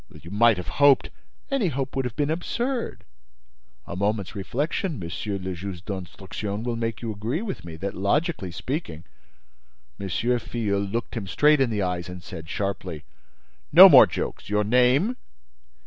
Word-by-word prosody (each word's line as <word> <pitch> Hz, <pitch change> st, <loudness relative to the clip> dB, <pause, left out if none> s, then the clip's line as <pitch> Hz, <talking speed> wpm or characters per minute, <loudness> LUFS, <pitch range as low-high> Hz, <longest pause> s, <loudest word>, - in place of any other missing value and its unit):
"You 85 Hz, -, -12 dB
might 115 Hz, 0 st, +4 dB
have 90 Hz, -, -6 dB
hoped—" 140 Hz, -1 st, +5 dB, 0.4 s
"Any 270 Hz, -8 st, +1 dB
hope 135 Hz, -3 st, -3 dB
would 135 Hz, -1 st, 0 dB
have 120 Hz, -2 st, -4 dB
been 145 Hz, +1 st, 0 dB
absurd. 235 Hz, +9 st, -3 dB, 0.8 s
A -, -, -7 dB
moment's 100 Hz, 0 st, -1 dB
reflection, 140 Hz, -, -2 dB
Monsieur 100 Hz, +3 st, -4 dB
le 95 Hz, 0 st, -4 dB
Juge 90 Hz, +1 st, -7 dB
d'Instruction, 100 Hz, +2 st, -5 dB
will 120 Hz, -1 st, -2 dB
make 115 Hz, 0 st, -3 dB
you 115 Hz, -, -2 dB
agree 115 Hz, -, -3 dB
with 205 Hz, -5 st, -5 dB
me 85 Hz, -1 st, -8 dB
that, 95 Hz, +4 st, -4 dB
logically 100 Hz, -, 0 dB
speaking—" 85 Hz, -, -5 dB, 1.0 s
M. 100 Hz, -, -4 dB
Filleul 115 Hz, -1 st, -1 dB
looked 115 Hz, +2 st, -3 dB
him 105 Hz, -4 st, -4 dB
straight 150 Hz, +9 st, +4 dB
in 130 Hz, -, +3 dB
the 105 Hz, -3 st, -1 dB
eyes 90 Hz, -1 st, -2 dB
and 90 Hz, -1 st, -9 dB
said, 80 Hz, -2 st, -9 dB
sharply: 95 Hz, -5 st, -4 dB, 0.7 s
"No -, -, +11 dB
more -, -, +9 dB
jokes! -, -, -5 dB
Your 105 Hz, 0 st, +2 dB
name?" 125 Hz, -, +3 dB
105 Hz, 160 wpm, -25 LUFS, 95-135 Hz, 1.0 s, No